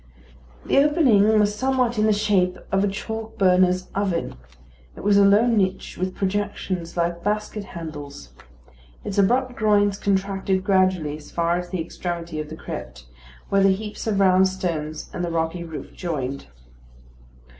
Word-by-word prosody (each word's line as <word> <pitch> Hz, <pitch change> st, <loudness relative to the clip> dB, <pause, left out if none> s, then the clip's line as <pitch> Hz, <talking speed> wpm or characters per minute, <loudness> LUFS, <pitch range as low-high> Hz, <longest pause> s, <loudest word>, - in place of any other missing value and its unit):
The -, -, +3 dB
opening 240 Hz, -8 st, +4 dB
was 205 Hz, 0 st, +2 dB
somewhat 250 Hz, -1 st, 0 dB
in 215 Hz, -, +3 dB
the -, -, +4 dB
shape 200 Hz, -3 st, +1 dB
of 195 Hz, 0 st, +2 dB
a -, -, +2 dB
chalk 220 Hz, +3 st, -5 dB
burner's 185 Hz, -1 st, +3 dB
oven. 195 Hz, -4 st, -1 dB, 0.6 s
It -, -, -9 dB
was 205 Hz, 0 st, +3 dB
a 200 Hz, -, +6 dB
low 200 Hz, +3 st, +5 dB
niche 195 Hz, -5 st, 0 dB
with 185 Hz, +1 st, -3 dB
projections 190 Hz, -3 st, -3 dB
like 170 Hz, 0 st, -1 dB
basket 210 Hz, 0 st, -2 dB
handles. 150 Hz, -5 st, -8 dB, 0.7 s
Its 200 Hz, 0 st, -2 dB
abrupt 245 Hz, +5 st, +2 dB
groins 205 Hz, -4 st, +2 dB
contracted 195 Hz, -1 st, 0 dB
gradually 185 Hz, -6 st, +1 dB
as 150 Hz, -, -14 dB
far 170 Hz, 0 st, 0 dB
as 180 Hz, 0 st, -7 dB
the 185 Hz, -, -3 dB
extremity 170 Hz, -1 st, -5 dB
of 150 Hz, -1 st, -5 dB
the 160 Hz, -, -8 dB
crypt, 65 Hz, -, -8 dB, 0.4 s
where 195 Hz, -, +3 dB
the 195 Hz, 0 st, +5 dB
heaps 210 Hz, +3 st, -6 dB
of 205 Hz, -3 st, +1 dB
round 190 Hz, -1 st, +5 dB
stones 165 Hz, -5 st, -4 dB
and 175 Hz, -, -3 dB
the 175 Hz, -, -1 dB
rocky 165 Hz, +1 st, -2 dB
roof 160 Hz, -2 st, -8 dB
joined. 140 Hz, -, -4 dB
190 Hz, 155 wpm, -23 LUFS, 170-205 Hz, 0.7 s, a